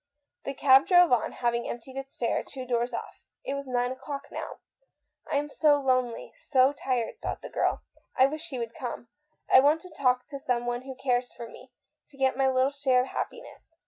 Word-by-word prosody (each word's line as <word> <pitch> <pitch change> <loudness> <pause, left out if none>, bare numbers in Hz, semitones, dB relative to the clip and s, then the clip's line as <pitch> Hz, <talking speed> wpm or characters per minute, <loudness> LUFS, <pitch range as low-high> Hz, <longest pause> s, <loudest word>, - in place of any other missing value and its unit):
The 275 - -4
cab 265 0 +6
drove 355 -3 +6
on, 245 -3 +2
hav 240 -1 0
ing 235 0 -2
emptied 250 +3 -7
its 270 0 -7
fare 235 - -1
two 260 -2 -8
doors 240 0 0
off. - - -7 0.2
It - - -2
was 280 -1 -5
nine 245 0 0
o'clock 275 +2 -7
now. - - -6 0.4
" - - -20
I - - +1
am 290 +1 +1
so 295 0 +3
lonely, 255 -3 0
so 265 0 +3
tired," 255 -5 -2
thought - - -4
the - - -8
girl. - - 0 0.2
" - - -45
I 260 - +7
wish 310 +4 -4
he 265 - -5
would 230 -1 -4
come. 240 -2 -6 0.4
I - - +10
want 290 +4 +4
to 365 - -13
talk 250 -2 +2
to 280 -1 -6
someone 245 -2 -1
who 265 -1 -7
cares 250 -1 0
for 235 - -8
me, - - -14 0.4
to 280 - -18
get 265 -1 +2
my 270 0 +2
little 260 +1 +2
share 270 -3 +2
of 255 - -3
happiness. 475 -8 -7
260 Hz, 215 wpm, -28 LUFS, 245-280 Hz, 0.4 s, I